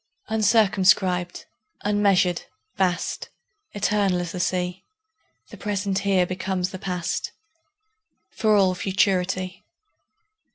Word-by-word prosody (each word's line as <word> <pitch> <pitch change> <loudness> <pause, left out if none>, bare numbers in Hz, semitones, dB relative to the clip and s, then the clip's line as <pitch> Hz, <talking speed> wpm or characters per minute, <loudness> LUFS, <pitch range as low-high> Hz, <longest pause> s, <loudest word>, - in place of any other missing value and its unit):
Uncircumscribed, 195 -5 +2 0.4
unmeasured, 200 -4 +2 0.3
vast, 180 -3 -1 0.4
Eternal 200 -3 +1
as 175 -1 -5
the 180 - -5
Sea, 180 0 -1 0.7
The - - -10
present 200 -2 -1
here 195 -2 +2
becomes 185 0 -2
the 185 - -7
past, 180 -2 -3 1.0
For 215 -2 +2
all 190 -2 +4
futurity. 185 0 0
190 Hz, 90 wpm, -24 LUFS, 180-200 Hz, 1.0 s, all